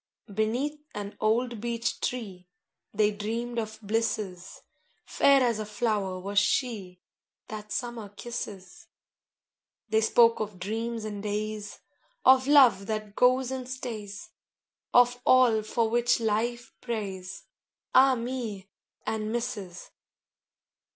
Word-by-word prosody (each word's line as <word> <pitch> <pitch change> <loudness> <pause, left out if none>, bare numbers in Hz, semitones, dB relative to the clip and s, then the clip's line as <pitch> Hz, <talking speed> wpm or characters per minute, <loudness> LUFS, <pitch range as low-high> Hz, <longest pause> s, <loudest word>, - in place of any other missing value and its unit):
VI 205 - -12
Beneath 245 +8 -1 0.2
an 205 0 -5
old 230 +1 +1
beech 235 0 -2
tree 195 -8 -4 0.4
They 210 0 +2
dreamed 230 +3 -3
of 220 -1 -5
blisses; 205 -4 -2 0.4
Fair 275 -1 +4
as 235 -3 +1
a 215 - -3
flower 205 -3 -1
was 200 +2 +1
she 205 -5 -1 0.5
That 210 -1 -7
summer 235 -4 -4
kisses: 235 - -7 1.0
They 220 +1 +3
spoke 230 +1 +5
of 210 -3 -4
dreams 225 +4 -3
and 205 -2 -5
days, 210 0 -4 0.4
Of 260 0 +6
love 250 -9 +6
that 215 -1 -4
goes 255 +1 +3
and 255 -1 -5
stays, 230 - -6 0.6
Of 245 0 +4
all 250 -4 +5
for 225 +2 0
which 240 +2 +2
life 230 +2 -1
prays, 195 -6 -5 0.5
Ah 265 0 +6
me! 230 -5 -5 0.3
and 215 -1 -2
misses. 205 -7 -4
220 Hz, 115 wpm, -28 LUFS, 205-240 Hz, 1.0 s, Of